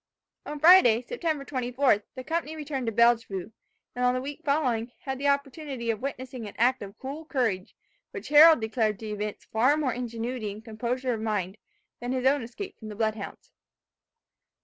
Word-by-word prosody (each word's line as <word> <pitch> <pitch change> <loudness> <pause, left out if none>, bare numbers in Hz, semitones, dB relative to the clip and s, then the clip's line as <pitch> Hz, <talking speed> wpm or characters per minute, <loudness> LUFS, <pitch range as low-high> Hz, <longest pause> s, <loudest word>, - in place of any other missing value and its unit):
On 295 0 -5
Friday, 285 -9 +7
September 320 - -3
24th, 255 -4 +1
the 255 - -6
company 320 +1 -2
returned 285 -5 -4
to - - +1
Bellevue; 225 -4 +2 0.4
and 250 - -2
on 250 0 +3
the 255 - -1
week 285 +4 -7
following, 255 -6 0
had 265 -2 -4
the 285 - 0
opportunity 280 -3 -1
of 220 - -5
witnessing 255 -3 -5
an 205 - -10
act 250 +2 +3
of 200 +1 -9
cool 280 +4 -6
courage, 235 -11 -1 0.3
which 410 -5 -8
Harold 310 0 +8
declared 220 -1 0
to - - -6
evince 210 0 -5
far 255 +7 +2
more 275 -5 0
ingenuity 235 -2 -4
and 215 +2 -12
composure 245 +3 -2
of 220 - -4
mind, 205 -3 -2 0.4
than 245 +1 -3
his 255 0 -2
own 280 +1 +4
escape 310 - -8
from 220 - -9
the 210 - -7
blood 220 0 +1
hounds. 210 -2 -9
250 Hz, 180 wpm, -27 LUFS, 225-280 Hz, 0.4 s, Harold